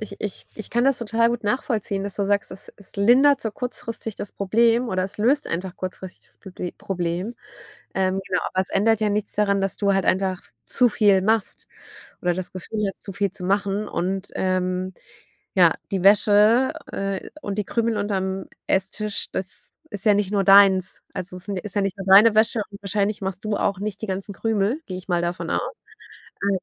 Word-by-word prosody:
ich 205 -2 -7
ich 205 -3 -5
ich 215 - -8
kann 240 +2 +2
das 275 -1 +3
total 230 0 +2
gut 235 -2 -3
nachvollziehen, 210 -3 -1
dass 200 0 -5
du 200 - 0
sagst: 200 0 0
„Es 195 - -11
es 200 0 -18
lindert 255 +7 +5
so 220 - -2
kurzfristig 230 -2 -6
das 200 - -6
Problem 230 +4 +2
oder 185 -3 0
es 200 +2 -7
löst 270 +7 +2
einfach 180 +2 -4
kurzfristig 185 0 -7
das - - -22
Probl 180 -2 -7
Problem.“ 180 +4 -3 0.6
Ähm, 190 0 0
genau, 180 - 0
aber 185 - +2
es 190 - -7
ändert 220 +2 +2
ja 210 - +2
nichts 205 0 -2
daran, 200 -1 +1
dass 195 - -2
du 200 -1 +2
halt 195 -1 +1
einfach 185 -1 +1 0.2
zu 250 -2 +3
viel 205 -3 +4
machst 220 +1 0 0.5
oder 175 -1 +1
das 185 0 -5
Gefühl 205 +3 -3
hast, 195 - -7
zu 195 - -7
viel 200 0 -1
zu 195 -2 -11
machen. 200 +2 0
Und, 190 +2 -2
ähm, 185 0 -1 0.6
ja, 175 -4 +5 0.2
die 190 -2 -1
Wäsche, 210 +6 +5 0.2
äh, 195 -1 -3
und 200 -1 -4
die 210 - 0
Krümel 230 +1 0
unterm 190 -2 -2 0.2
Esstisch, 200 +2 -1
das 190 0 -5 0.2
ist 205 -2 -7
ja 210 - +6
nicht 200 -1 0
nur 200 -1 +2
deins, 195 -1 +5
also, 185 -1 -5
es 180 +3 -11
ist 195 -2 -2
ist 210 -1 -6
ja 205 - +1
nicht 195 0 -2
nur 195 - -6
deine 210 +3 +8
Wäsche 220 +1 +3
und 200 - -11
wahrscheinlich 200 +1 -1
machst 190 +1 -4
du 215 -1 -1
auch 195 -2 0
nicht 205 0 -4
die - - -2
ganzen 195 +1 -4
Krümel, 225 - 0
gehe 185 - -5
ich 185 - -10
mal 175 -1 +1
davon 175 +1 -3
aus. 480 - -3 0.6
Äh, 200 -1 +1
200 Hz, 205 wpm, -23 LUFS, 190-215 Hz, 0.6 s, deine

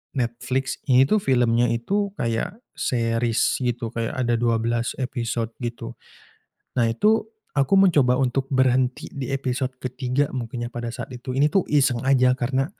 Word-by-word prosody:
Netflix, 125 +1 -2
ini 130 -1 +6
tuh 210 +11 +2
filmnya 120 - +2
itu 195 - -1
kayak 180 - -3
series 115 -1 0
gitu, 120 -2 -2
kayak 115 -1 -3
ada 120 -2 0
12 115 0 0
episode, 120 -3 -3
gitu. 120 -1 -5 0.9
Nah, 115 - +3
itu 215 - +2 0.2
aku 140 +3 +1
mencoba 145 -10 +4
untuk 135 +1 0
berhenti 130 -1 +2
di 135 -3 -5
episode 130 -1 -2
ke-3 130 +2 -1
mungkin 120 -1 -4
ya 120 - -8
pada 120 0 -4
saat 120 +2 -7
itu, 125 +1 -5
ini 140 - +4
tuh 190 +6 +3
iseng 135 -5 +2
aja 130 -1 +4
karena 130 +2 0
125 Hz, 150 wpm, -23 LUFS, 120-135 Hz, 0.9 s, ini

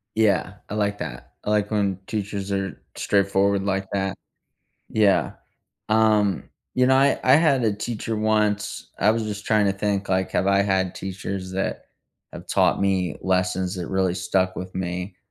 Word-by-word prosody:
Yeah, 100 -3 +2
I - - -5
like 105 -1 0
that, - - -7
I - - -2
like 105 -1 +1
when 100 -3 0
teachers 100 -2 -3
are 95 -1 -3
straightforward 100 0 +2
like 95 -1 -1
that, 95 -1 -1 0.7
yeah, 105 -3 +3 0.6
um, 110 -2 +3 0.3
you 125 - +4
know, 130 - +5
I 135 +1 +4
I 130 - +6
had 140 -5 +3
a 110 -2 +2
teacher 110 +1 -4
once 105 -1 0
I 105 - +5
was 115 0 -1
just 105 -1 -5
trying 105 -2 +3
to 100 - +2
think, 100 0 -1
like, 95 0 +1
have 95 - +1
I 100 0 +4
had 95 -2 0
teachers 95 0 -5
that 95 +1 -3 0.5
have - - -9
taught - - +2
me 95 -4 0
lessons 95 0 0
that 90 -3 -4
really 95 -2 +1
stuck 95 +1 0
with 90 0 -6
me, 90 +1 -4
100 Hz, 170 wpm, -24 LUFS, 95-105 Hz, 0.7 s, I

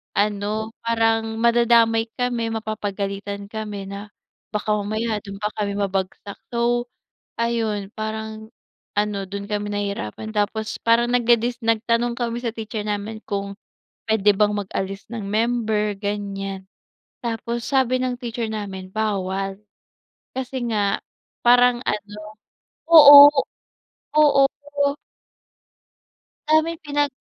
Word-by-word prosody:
ano, 210 +2 -1
parang 225 -1 +1
madadamay 230 -1 +4
kami, 240 -2 0
mapapagalitan 200 -2 -4
kami 210 -3 -5
na 200 +1 -7 0.4
baka 210 0 0
mamaya 215 +2 -2
dun 200 -1 -8
pa 210 - 0
kami 200 -1 -2
mabagsak. 195 0 -3 0.2
So 240 +1 0 0.5
ayun, 225 -4 -1
parang 220 0 -5 0.5
ano 210 0 +1
dun 200 +1 -6
kami 205 0 -2
nahihirapan, 200 - -4
tapos 215 +1 -1
parang 235 +1 +3
nagdedis 240 0 +2
nagtanong 230 +1 +1
kami 235 -1 -2
sa 235 - -1
teacher 220 -1 -5
namin 210 +1 -3
kung 200 0 -3 0.5
pwede 210 -2 +4
bang 210 0 +2
mag-alis 195 0 -4
ng 230 -3 -5
member, 215 -1 0
ganyan. 195 -2 -4 0.6
Tapos, 235 0 -3
sabi 260 -2 +2
ng 255 -1 -1
teacher 235 -1 -4
namin 200 -3 -5
bawal. 195 -2 -2 0.7
Kasi 260 -1 -4
nga 205 -2 +1 0.4
parang 245 0 +5
ano 210 -2 -3 0.7
oo, 290 -3 +11 0.9
oo. 285 -2 +6 2.0
Sa'min 315 +2 +2
pinag 290 0 +1
220 Hz, 110 wpm, -22 LUFS, 205-235 Hz, 2.0 s, oo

